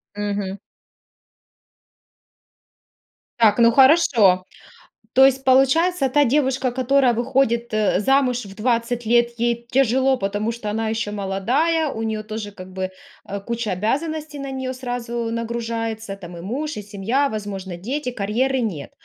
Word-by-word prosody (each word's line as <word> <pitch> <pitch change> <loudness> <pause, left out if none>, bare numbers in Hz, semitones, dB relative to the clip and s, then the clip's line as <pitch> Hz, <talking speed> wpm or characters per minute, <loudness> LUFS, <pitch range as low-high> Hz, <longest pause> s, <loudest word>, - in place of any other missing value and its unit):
Мгм. 205 -1 -3 2.8
Так 220 0 +4
ну 235 0 +6
хорошо. 245 - +5 0.7
То 265 - +7
есть 270 0 +3
получается: 270 +4 +3
та 290 +3 +3
девушка, 265 -1 +1
которая 260 0 +2
выходит, 240 -1 0
э, 215 -3 +2
замуж 255 0 +2
в 195 -1 -11
20 235 0 -1
лет, 235 +1 +3
ей 235 0 -1
тяжело 265 +1 +3
потому 205 +2 -2
что 225 -2 -6
она 220 +1 -2
ещё 220 -1 -2
молодая, 250 - 0
у 225 -5 -5
неё 220 -1 -2
тоже 215 -1 -6
как 185 -2 -11
бы, 185 0 -3 0.4
э, 200 0 -4
куча 235 +1 -3
обязанностей 295 - -2
на 275 - -5
неё 260 -1 -4
сразу 240 -2 -4
нагружается- 225 -2 -4
там 175 -3 -10
и 170 - -8
муж, 275 - -4
и 210 - -5
семья, 210 +8 -1
возможно, 200 -5 -5
дети, 250 +9 -3
карьеры 245 +5 0
нет. 185 -12 -4
235 Hz, 140 wpm, -21 LUFS, 210-265 Hz, 2.8 s, То